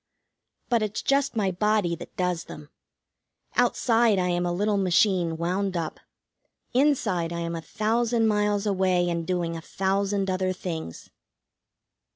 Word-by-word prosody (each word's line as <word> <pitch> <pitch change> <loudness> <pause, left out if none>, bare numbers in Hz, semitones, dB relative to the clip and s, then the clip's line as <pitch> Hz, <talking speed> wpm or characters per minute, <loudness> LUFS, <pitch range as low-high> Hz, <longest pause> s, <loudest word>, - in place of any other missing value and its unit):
But 235 -2 +2
it's 215 -1 -2
just 275 -2 +1
my 200 -4 +1
body 205 -2 +1
that - - -11
does 180 -2 -1
them. 150 0 -11 0.9
Outside 230 -3 +3
I 180 -1 +1
am 175 0 0
a - - 0
little 205 +3 +1
machine 180 -3 +2
wound 185 +2 -1
up; 165 -2 -4 0.7
inside 235 - +1
I 170 0 -3
am 170 0 -3
a 165 - -4
thousand 225 +4 0
miles 210 -1 +1
away, 185 -3 +2
and 170 -1 -3
doing 175 -2 -1
a 165 - -6
thousand 195 +3 -1
other 185 0 0
things. 165 - -6
190 Hz, 145 wpm, -26 LUFS, 175-210 Hz, 0.9 s, Outside